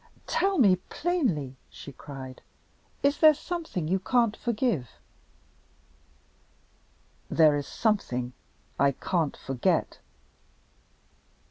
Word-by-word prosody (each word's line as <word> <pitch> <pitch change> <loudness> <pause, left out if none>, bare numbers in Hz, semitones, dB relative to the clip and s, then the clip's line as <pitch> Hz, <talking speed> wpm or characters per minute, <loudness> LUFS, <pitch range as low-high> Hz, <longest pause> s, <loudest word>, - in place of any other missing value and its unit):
"Tell 390 0 +1
me 200 - +5
plainly," 185 - -2
she 140 - -10
cried, 130 -1 -9 0.6
"is 280 +1 +2
there 310 -1 +7
something 320 - -4
you 190 +3 +1
can't 230 +2 +2
forgive?" 220 - -1 2.4
"There 155 -2 +5
is 145 -1 -3
something 125 - -1 0.5
I 140 +1 +4
can't 165 +2 -1
forget." 135 -3 -1
185 Hz, 90 wpm, -27 LUFS, -, 2.4 s, there